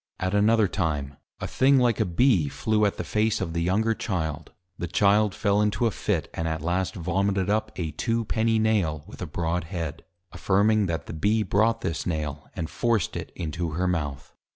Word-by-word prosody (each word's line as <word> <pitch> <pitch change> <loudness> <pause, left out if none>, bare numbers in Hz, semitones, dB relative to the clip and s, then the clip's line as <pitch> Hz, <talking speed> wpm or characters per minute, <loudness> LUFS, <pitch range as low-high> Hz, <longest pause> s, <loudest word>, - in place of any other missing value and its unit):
At 95 +1 -1
another 105 +1 +4
time, 75 -7 -2 0.2
a - - -3
thing 135 +1 +3
like 120 -4 +2
a - - +3
Bee, 90 - +3
flew 105 +10 +1
at 100 - -3
the - - -3
Face 110 0 +1
of 85 -3 -3
the 85 - -1
younger 105 +6 +2
Child; 80 -8 -3 0.2
the 90 - -4
Child 100 +3 +3
fell 100 -1 +2
into 105 +2 +1
a 115 - +2
Fit; - - -1
and 80 - -2
at 80 -1 -3
last 90 +2 -1
Vomited 95 +3 0
up 110 0 0
a 80 -3 -3
Two 115 +4 -1
penny 115 +1 +1
Nail, 100 -9 +1
with 100 - -12
a 90 - -3
Broad 85 +2 -2
Head; 80 -4 -5 0.3
affirming, 105 +1 +2
_That 80 -3 -3
the - - -7
Bee 105 +7 +1
brought 115 +3 +2
this 80 0 -3
Nail, 75 -3 -3
and 80 - -3
forced 115 -1 0
it - - -5
into 80 0 -3
her 90 +3 0
Mouth. 75 -6 -3
95 Hz, 200 wpm, -26 LUFS, 80-110 Hz, 0.3 s, another